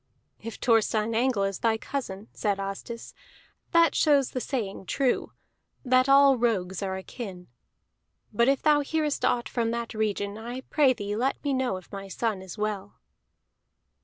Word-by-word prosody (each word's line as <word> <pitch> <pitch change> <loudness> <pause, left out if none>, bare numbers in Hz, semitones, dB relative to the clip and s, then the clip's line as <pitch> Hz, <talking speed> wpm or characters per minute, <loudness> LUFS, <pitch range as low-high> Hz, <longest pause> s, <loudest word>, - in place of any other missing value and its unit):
"If 230 +1 -6
Thorstein 225 -1 +2
Angle 235 -3 +2
is 195 -1 -2
thy 225 -1 +2
cousin," 220 -5 -5
said 200 -2 -1
Asdis, 195 +4 -6 0.6
"that 335 -3 +4
shows 285 -4 +3
the 255 - -3
saying 205 -8 -4
true, 270 -3 0 0.5
that 255 +1 +4
all 275 -2 +6
rogues 190 -6 0
are 190 -1 -2
akin. 190 -2 -8 0.9
But 235 +3 +3
if 275 -1 +2
thou 300 -1 +5
nearest 300 0 -1
aught 240 -1 +1
from 230 -2 -1
that 235 0 -3
region, 210 -1 -2
I 240 +3 -6
pray 275 -1 +3
thee 205 -3 -4
let 255 +5 -1
me 285 -2 0
know 260 -7 0
if 185 - -14
my 195 0 -7
son 210 0 -2
is 190 +2 -9
well." 210 -2 -3
230 Hz, 160 wpm, -27 LUFS, 200-260 Hz, 0.9 s, all